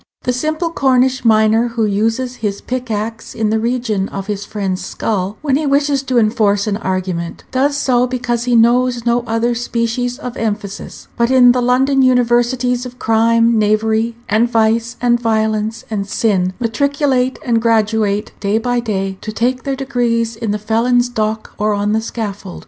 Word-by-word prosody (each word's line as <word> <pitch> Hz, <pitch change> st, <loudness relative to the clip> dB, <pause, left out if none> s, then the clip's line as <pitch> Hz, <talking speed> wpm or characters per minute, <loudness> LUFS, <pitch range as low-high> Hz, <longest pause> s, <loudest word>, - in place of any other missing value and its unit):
The 250 Hz, -, 0 dB
simple 310 Hz, +6 st, -2 dB
Cornish 260 Hz, -4 st, +2 dB
miner 220 Hz, +1 st, +3 dB
who 230 Hz, -1 st, -1 dB
uses 225 Hz, +5 st, -1 dB
his 200 Hz, -2 st, -3 dB
pickaxe 225 Hz, -3 st, -4 dB
in 220 Hz, -1 st, 0 dB
the 220 Hz, -, +1 dB
region 225 Hz, -4 st, -1 dB
of 195 Hz, -1 st, -5 dB
his 205 Hz, -1 st, -4 dB
friend's 195 Hz, -3 st, -3 dB
skull 200 Hz, -1 st, -3 dB
when 275 Hz, -3 st, +2 dB
he 300 Hz, 0 st, -2 dB
wishes 280 Hz, 0 st, +2 dB
to 260 Hz, -2 st, -1 dB
enforce 215 Hz, -3 st, +2 dB
an 205 Hz, -2 st, -1 dB
argument, 185 Hz, -4 st, -3 dB
does 280 Hz, +2 st, +1 dB
so 250 Hz, -3 st, +2 dB
because 240 Hz, -1 st, -2 dB
he 245 Hz, -1 st, +2 dB
knows 240 Hz, +1 st, +3 dB
no 240 Hz, 0 st, +2 dB
other 230 Hz, +2 st, 0 dB
species 240 Hz, +1 st, -2 dB
of 250 Hz, -4 st, -7 dB
emphasis. 205 Hz, -2 st, -5 dB
But 235 Hz, 0 st, +2 dB
in 255 Hz, -2 st, +6 dB
the 250 Hz, 0 st, +1 dB
London 265 Hz, +3 st, +2 dB
universities 245 Hz, 0 st, +2 dB
of 250 Hz, -1 st, -9 dB
crime, 230 Hz, 0 st, +3 dB
knavery, 220 Hz, +2 st, +1 dB
and 220 Hz, +3 st, +2 dB
vice, 230 Hz, +1 st, +1 dB
and 240 Hz, -1 st, +2 dB
violence, 220 Hz, -1 st, -1 dB
and 200 Hz, -2 st, -2 dB
sin 190 Hz, -4 st, 0 dB
matriculate 260 Hz, +2 st, 0 dB
and 230 Hz, -3 st, +1 dB
graduate 220 Hz, -2 st, +1 dB
day 200 Hz, +1 st, 0 dB
by 245 Hz, +1 st, 0 dB
day, 195 Hz, -4 st, -3 dB
to 215 Hz, -, -5 dB
take 250 Hz, +4 st, -1 dB
their 275 Hz, -1 st, -1 dB
degrees 240 Hz, -4 st, -1 dB
in 225 Hz, -1 st, -4 dB
the 210 Hz, -, 0 dB
felon's 240 Hz, +3 st, +1 dB
dock 220 Hz, -2 st, -3 dB
or 210 Hz, 0 st, +1 dB
on 205 Hz, +1 st, 0 dB
the 220 Hz, -, +1 dB
scaffold. 205 Hz, -5 st, -6 dB
230 Hz, 170 wpm, -16 LUFS, 215-250 Hz, -, in